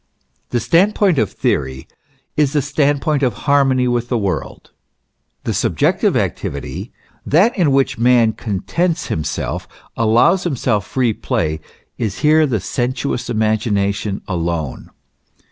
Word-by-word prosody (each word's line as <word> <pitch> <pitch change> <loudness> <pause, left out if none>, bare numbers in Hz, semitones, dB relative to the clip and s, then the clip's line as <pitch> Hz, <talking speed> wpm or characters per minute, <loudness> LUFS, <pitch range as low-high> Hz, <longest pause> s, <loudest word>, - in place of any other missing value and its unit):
* - - -46
The 120 - 0
stand 185 - +3
point 185 -8 +3
of 110 - 0
theory 65 0 -2 0.5
is 150 -1 +2
the 150 - +2
stand 145 -1 +1
point 150 -3 +1
of 130 -3 +1
harmony 135 -3 +3
with 120 -1 -1
the 120 - +1
world. 100 -4 -4 0.7
The - - -2
subjective - - +1
activity, - - -3 0.3
that 190 - +3
in 170 -8 +2
which 135 -4 +1
man 120 -2 +4
contents 160 - -2
himself, 80 -1 -3 0.3
allows 120 - +3
himself 120 - -1
free 125 -4 +1
play, 80 -5 -2 0.4
is 110 -4 -3
here 155 +1 +4
the 115 -5 0
sensuous 125 +3 -2
imagination 105 -2 0
alone. 85 -5 -3
120 Hz, 130 wpm, -18 LUFS, 105-145 Hz, 0.7 s, man